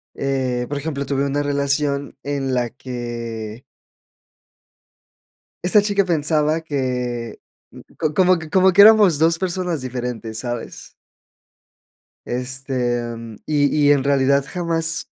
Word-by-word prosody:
eh, 130 -3 -1
por 145 - -3
ejemplo, 140 -2 -4
tuve 140 +1 0
una 145 +1 -1
relación 140 0 -1
en 140 -2 -2
la 120 -1 0
que 120 -3 -6 2.0
esta 185 +4 +5
chica 200 -1 +1
pensaba 155 -1 +1
que 125 -6 -3 0.8
como 185 -1 +4
que 160 -1 -9
como 190 +3 +4
que 190 +3 +6
éramos 210 -6 +7
dos 165 +1 +3
personas 180 -3 -2
diferentes, 120 -3 -5
¿sabes? 120 -1 -6 1.4
Este, 125 0 -2
em, 115 -2 -7
y 145 -2 +2 0.2
y 145 - +6
en 140 -2 +3
realidad 140 0 +2
jamás, 165 -1 -2
140 Hz, 115 wpm, -20 LUFS, 125-160 Hz, 2.0 s, éramos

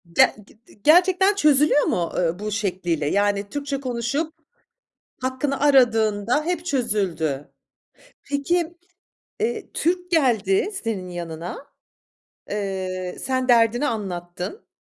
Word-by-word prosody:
Ge - - +6
g 220 - -22
di 205 - -21
gerçekten 375 +5 +5
çözülüyor 300 -3 +4
mu, 170 -1 0
ııı, 175 +1 0
bu 210 0 -4
şekliyle? 180 -6 -1
Yani, 200 +1 +1
Türkçe 280 0 -3
konuşup 260 +5 -2 0.9
hakkını 260 +2 -2
aradığında 240 -2 +3
hep 345 0 -2
çözüldü. 190 - -1 0.7
Peki, 330 +5 -1 0.7
ııı, 465 - -1
Türk 360 +1 0
geldi 245 - +2
senin 205 -6 -3
yanına. 175 - -6 0.8
Iıı, 185 -3 -3
sen 260 -1 -1
derdini 235 +3 +4
anlattın. 180 - -5
230 Hz, 105 wpm, -23 LUFS, 190-290 Hz, 0.9 s, Ge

